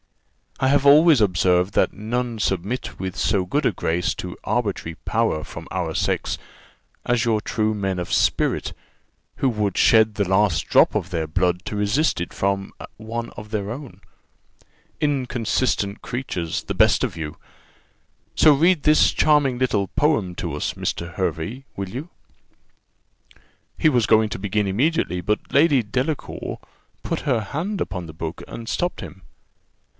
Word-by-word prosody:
"I 130 - +2
have 140 +1 +3
always 150 -1 +7
observed 90 -1 +2
that - - +2
none 120 +2 -3
submit 100 +4 -2
with 95 -1 -4
so 95 -3 +1
good 145 +10 -1
a - - +2
grace 85 -1 -1
to - - -6
arbitrary 80 - -2
power 110 -9 0
from - - -9
our 85 -3 -2
sex - - -1 0.7
as 120 0 +1
your 110 -2 +1
true 110 -1 0
men 95 -3 -2
of 90 - -4
spirit, - - +1 0.6
who 135 - +2
would 105 -5 -1
shed 110 -2 +4
the 100 -2 0
last 95 -3 +2
drop - - +5
of 90 - -1
their 85 -3 -2
blood 90 +3 0
to 105 - -4
resist 105 - +1
it 85 - -4
from 100 0 -2 0.2
one 115 +2 -5
of 105 0 -10
their 105 -1 -3
own. 135 +1 -9 1.0
Inconsistent 120 -6 -1
creatures, 90 -10 -3
the - - -4
best - - +4
of - - -2
you! 75 -2 -5 1.0
So 155 - +6
read 165 +2 +3
this 155 0 +5
charming 145 -4 +3
little 105 -6 +1
poem 125 - +1
to - - -4
us, - - -2
Mr. 85 0 -4
Hervey, 90 - -3
will 100 -1 -4
you?" 135 - -6 1.7
He 155 - +5
was 120 -6 +2
going 110 0 +4
to - - -5
begin 105 +1 0
immediately, 100 - 0
but 105 +3 -2
Lady 145 -2 +5
Delacour 130 +8 -3 0.4
put - - -2
her 125 -6 +1
hand 170 - -3
upon 90 -2 -3
the 80 - -10
book, 80 +1 -6
and 115 -1 -8
stopped 175 0 -2
him. 95 -1 -10
105 Hz, 155 wpm, -22 LUFS, 95-130 Hz, 1.7 s, always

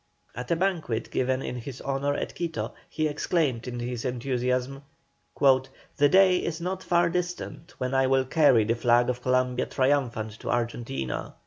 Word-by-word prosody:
At 125 +1 -7
a 170 - +3
banquet 165 -11 -1
given 130 +1 0
in 125 - -4
his 125 +2 -7
honour 140 +1 -1
at - - -4
Quito 170 -2 -4 0.2
he 155 0 -1
exclaimed 145 -5 -1
in 120 -1 -4
his 120 -1 -4
enthusiasm: 125 +1 -1 0.6
"The 135 +1 +2
day 190 +1 +6
is 165 -2 -3
not 185 +2 -3
far 175 -1 +2
distant 175 0 -4
when 130 +1 -2
I 135 0 +3
will 130 0 +3
carry 130 -5 +4
the 115 +2 +1
flag 120 +1 +3
of 125 0 -7
Columbia 125 0 +1
triumphant 125 -6 0
to - - -6
Argentina." 115 - -3
130 Hz, 160 wpm, -27 LUFS, 120-155 Hz, 0.6 s, day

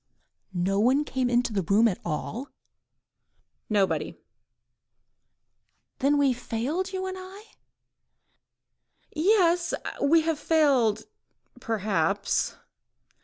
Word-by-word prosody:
"Nobody 200 +10 +2
came 260 -3 -1
into 240 -1 +1
the 200 - +1
room 200 +6 +3
at 195 - -2
all?" 215 - -4 1.2
"Nobody." 190 -7 0 1.8
"Then 285 +2 +2
we 280 -2 +3
have 245 0 -6
failed, 295 +13 -2
you 375 0 -3
and 375 0 -5
I?.. 380 +3 -11 0.9
." - - -39
"Yes! 350 -1 +3 0.3
we 320 +4 +4
have 320 -2 -1
failed—perhaps 220 - 0
250 Hz, 90 wpm, -26 LUFS, 210-325 Hz, 1.8 s, we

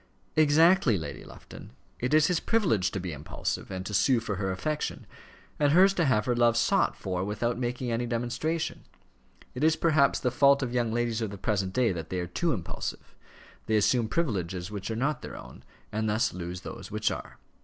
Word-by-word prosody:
"Exactly, 155 - +5
Lady 75 -4 -6
Lufton. - - -12 0.3
It 125 - -1
is 155 0 +5
his 175 +1 +1
privilege 140 - +1
to 95 - -4
be 90 -3 -5
impulsive 75 +1 -4
and 95 -1 -5
to 105 - -5
sue 125 +4 +3
for 105 -4 -4
her 95 -1 -1
affection, 150 +12 -3 0.5
and 145 -1 +3
hers 190 +3 +6
to 175 -4 +1
have 105 -6 +2
her 125 - +1
love 120 -1 +3
sought 195 +11 +2
for 90 -2 -3
without 110 +4 -2
making 125 0 -2
any 120 +1 -1
demonstration. 125 +8 -2 0.7
It 125 - -4
is 160 0 +4
perhaps 155 -4 +3
the 125 - 0
fault 140 +2 +4
of 120 -2 -3
young 120 -2 0
ladies 120 -1 -1
of 110 - -1
the 100 - -8
present 100 -2 -1
day 125 -2 +2
that 80 -3 -5
they 90 - -2
are 90 - -2
too 160 - -1
impulsive. 95 - -5 0.5
They 110 - +2
assume 110 +2 +3
privileges 95 - -2
which 100 -1 -5
are 110 - -2
not 135 +4 -1
their - - -8
own, - - -12 0.3
and 110 0 -1
thus 110 +2 +1
lose 90 0 -6
those - - -8
which - - 0
are." - - -7
120 Hz, 200 wpm, -28 LUFS, 100-145 Hz, 0.7 s, hers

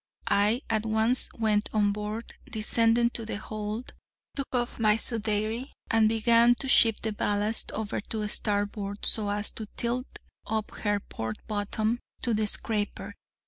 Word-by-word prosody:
I 210 +5 +2
at 220 -1 0
once 220 +3 +2
went 215 -2 +1
on 205 -2 +3
board, 210 +2 -5 0.2
descended 230 +2 +3
to 230 - -3
the 220 - -4
hold, 215 +2 -5 0.4
took 275 -2 -3
off 240 -1 -1
my 215 -2 +5
sudeyrie, 225 +2 -1 0.2
and 225 -2 +5
began 230 +2 +5
to 270 - -5
shift 225 -4 +5
the 220 -1 -1
ballast 205 +2 0
over 215 -2 -3
to 215 -2 -2
starboard, 205 -1 -2
so 210 -2 -1
as 205 +1 -1
to 220 - -6
tilt 245 +2 -1 0.4
up 220 -1 -2
her 205 -1 0
port 110 - -5
bottom 215 +2 -1 0.2
to 240 - +1
the 215 0 +1
scraper. 210 0 +1
220 Hz, 150 wpm, -28 LUFS, 210-230 Hz, 0.4 s, my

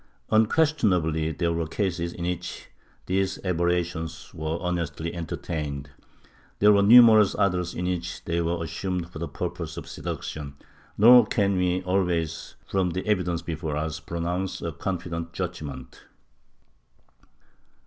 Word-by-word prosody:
Unques 130 +9 +4
tionably 80 - 0
there 85 -1 +1
were 85 -1 -2
cases 85 -2 -2
in 85 - -5
which 90 -1 -4 0.4
these 95 +1 0
aberrations 85 -2 -1
were 80 0 -3
honestly 85 -2 -3
entertained; 75 -4 -4 0.7
there 105 +1 +6
were 100 - +5
numerous 110 -1 +7
others 90 -3 0
in 90 - -3
which 90 -1 -3
they 85 0 0
were 85 0 -1
assumed 90 +1 -3
for 80 - -8
purposes 70 - -5
of - - -7
seduction, 70 -2 -6 0.4
nor 120 +1 +8
can 100 -4 +1
we 90 0 +1
always, 90 -4 -1
from 95 -2 0
the 90 +2 -4
evidence 90 -5 0
before 80 -3 -3
us, 75 0 -3
pronounce 85 +3 -3
a 85 - -2
confident 85 -1 -4
judgement. 75 -8 -6
85 Hz, 130 wpm, -26 LUFS, 80-95 Hz, 0.7 s, nor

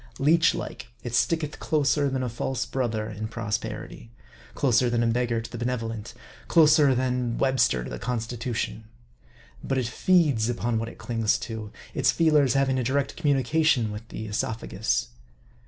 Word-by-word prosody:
Leech 160 +4 +4
like, - - -6 0.2
it 120 - -5
sticketh 150 +5 0
closer 145 -1 +1
than 130 -1 -2
a - - -1
false 125 +2 -2
brother 115 -5 -2
in 110 0 -5
prosper 115 -2 -3
ity; 115 - -13 0.5
closer 125 -3 +3
than 120 0 +1
a - - +1
beggar 115 0 +1
to 115 - -8
the 120 - -6
benevolent; 115 -2 -3 0.3
closer 150 -4 +5
than 125 -2 -1
Webster 130 - +2
to - - -7
the - - -5
Constitution. 120 -2 -3 0.8
But 135 - -1
it 130 - 0
feeds 140 -3 +2
upon 120 -1 -1
what 115 0 -3
it - - -13
clings 115 0 0
to; 110 -3 -6 0.2
its - - +2
feelers 150 -5 +3
having 135 -1 +2
a - - 0
direct 140 +3 0
communication 145 -5 +2
with 105 +2 -8
the 110 - -6
esophagus. 65 - -2
120 Hz, 160 wpm, -26 LUFS, 115-135 Hz, 0.8 s, closer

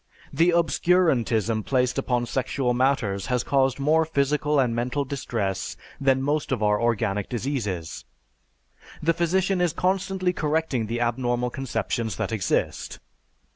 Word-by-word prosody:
The 170 +2 +4
obscurantism 150 - +2
placed 125 +1 +1
upon 125 -2 0
sexual 130 0 -1
matters 120 -7 0
has 125 -1 0
caused 135 -1 +1
more 155 +3 +3
physical 150 -1 +1
and 125 -3 +2
mental 125 +4 -1
distress 115 -8 -3 0.2
than 135 -1 +2
most 145 +1 -1
of 105 - 0
our 105 0 +2
organic 110 -4 0
diseases. 110 - -3 1.0
The 165 +2 +3
physician 185 +3 +1
is 175 -3 +1
constantly 185 0 0
correcting 150 -8 -1
the 120 +2 -2
abnormal 120 0 0
conceptions 115 -3 -2
that - - -3
exist. 110 -4 -1
130 Hz, 130 wpm, -25 LUFS, 115-155 Hz, 1.0 s, The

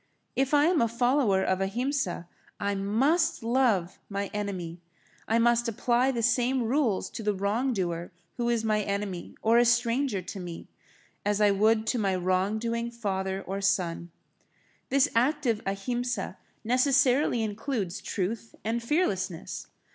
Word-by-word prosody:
If 270 0 +1
I 290 +1 +5
am 340 -1 +3
a 230 - +3
follower 235 -4 +2
of 190 0 0
Ahimsa, 220 -3 -1 0.3
I 200 0 0
must 270 - +1
love 230 -7 +1
my 200 0 -3
enemy. 185 -5 -4 0.5
I 225 - +2
must 235 +1 +3
apply 240 +3 +1
the 235 -3 -1
same 245 +1 +2
rules 235 -4 +1
to - - -6
the 210 -1 0
wrong 210 +7 0
doer 175 -5 -2 0.3
who 240 -1 0
is 235 -2 +1
my 215 -1 +1
enemy 200 -3 -4
or 230 +2 +5
a - - +6
stranger 240 -2 +1
to 195 - -7
me, 175 -2 -7 0.6
as 205 0 +1
I 210 -1 +5
would 215 +2 +3
to 245 - 0
my 195 -3 +1
wrong 185 +3 +1
doing 235 +1 -2
father 195 -4 -3
or 195 +1 -4
son. 180 -3 0 0.8
This 275 +1 +4
active 250 -2 +1
Ahimsa 240 +6 -2 0.2
necessarily 255 0 +3
includes 210 -3 -3
truth 210 +4 -3
and 230 +2 -1
fearlessness. 195 - -1
225 Hz, 145 wpm, -28 LUFS, 195-245 Hz, 0.8 s, a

